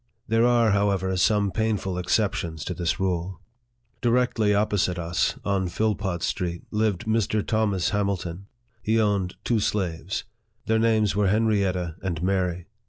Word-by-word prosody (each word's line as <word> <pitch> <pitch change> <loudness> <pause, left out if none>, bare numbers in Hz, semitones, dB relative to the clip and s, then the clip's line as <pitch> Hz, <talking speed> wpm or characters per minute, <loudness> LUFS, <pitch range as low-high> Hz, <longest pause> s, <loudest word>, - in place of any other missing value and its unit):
There 115 +2 +3
are, 120 -3 +4
however, 100 -2 +1
some 100 +2 +2
painful 105 -4 -1
exceptions 90 -5 -1
to - - -3
this 85 -2 -1
rule. 90 -1 -2 0.6
Directly 120 -3 +2
opposite 105 -3 +1
to 85 - -4
us, 85 +1 0
on 95 -2 0
Philpot 95 -2 -1
Street, 85 -3 -2
lived 105 -4 0
Mr. 110 -1 0
Thomas 100 -6 +1
Hamilton. 100 -3 -2 0.3
He 110 +2 +1
owned 100 -4 0
two 115 -2 +1
slaves. 95 -3 -2 0.4
Their 110 0 +2
names 110 -3 +2
were 105 -1 +2
Henrietta 95 -5 +1
and 85 -3 -3
Mary. 90 -2 0
100 Hz, 140 wpm, -25 LUFS, 90-110 Hz, 0.6 s, are